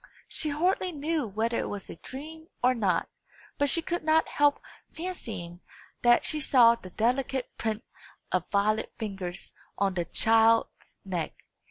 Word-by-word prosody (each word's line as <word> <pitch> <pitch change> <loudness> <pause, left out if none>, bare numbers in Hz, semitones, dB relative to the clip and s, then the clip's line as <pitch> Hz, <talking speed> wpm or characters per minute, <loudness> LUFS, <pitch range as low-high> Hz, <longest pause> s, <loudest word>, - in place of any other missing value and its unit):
She 310 - -3
hardly 360 +5 +1
knew 305 -3 -1
whether 225 +3 -1
it - - -2
was 200 -2 -5
a - - -8
dream 315 - -9 0.2
or 250 +1 +5
not, 195 -8 +1 0.5
but 285 0 +3
she 335 +4 +2
could 345 0 -2
not 315 +1 +3
help 290 0 +3 0.3
fancying 210 - -6 0.4
that 240 0 +5
she 310 - +2
saw 245 -5 +6
the 210 -5 -9
delicate 250 +5 -1
print 220 -1 -2 0.5
of 180 -1 0
Violet's 215 +2 +1
fingers 195 -5 -4 0.2
on 195 -1 +1
the 175 -2 -1
child's 225 +3 +3
neck. 180 -4 -3
235 Hz, 150 wpm, -28 LUFS, 200-295 Hz, 0.5 s, saw